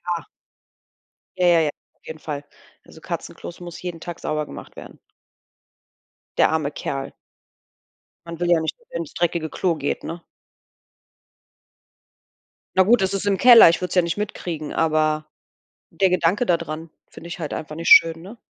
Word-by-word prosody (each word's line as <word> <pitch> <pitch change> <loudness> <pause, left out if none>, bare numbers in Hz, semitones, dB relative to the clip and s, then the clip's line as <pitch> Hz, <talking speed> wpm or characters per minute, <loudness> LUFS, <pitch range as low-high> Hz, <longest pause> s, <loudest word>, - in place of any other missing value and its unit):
Ja. 165 - -7 1.1
Ja, 180 -1 +3
ja, 170 -1 +5
ja, 150 - +1 0.2
auf - - -36
jeden 160 -1 -8
Fall. 145 -2 -6 0.4
Also - - -16
Katzenklos 175 - -7
muss 175 -1 -9
jeden 175 -2 -6
Tag 175 0 -7
sauber 155 -1 -2
gemacht - - -11
werden. - - -11 1.4
Der - - +5
arme 155 -2 -1
Kerl. 135 -2 -5 1.2
Man 170 -1 -7
will 175 0 0
ja 170 -2 +5
nicht, 160 - -3
dass 470 - -29
er - - -5
ins 325 - -6
dreckige 170 -2 -1
Klo 180 -3 0
geht, 145 -2 -3
ne? 170 +1 -6 2.6
Na 190 - +7
gut, 230 +4 +4
das 190 0 0
ist 195 0 -2
im 200 -1 +2
Keller, 235 -5 +9
ich 165 - +1
würd's 180 +1 -4
ja 180 - +6
nicht 170 +2 -3
mitkriegen, 175 -7 -5
aber 155 -1 +1 0.6
der 190 -2 +2
Gedanke 180 +7 +2
da 170 -5 +2
dran 155 +2 -7 0.2
finde 170 - -12
ich 180 - -7
halt 155 -4 -4
einfach 155 -1 -6
nicht 165 +1 -4
schön, 165 0 +7
ne? 200 +7 -11
170 Hz, 170 wpm, -22 LUFS, 155-180 Hz, 2.6 s, Keller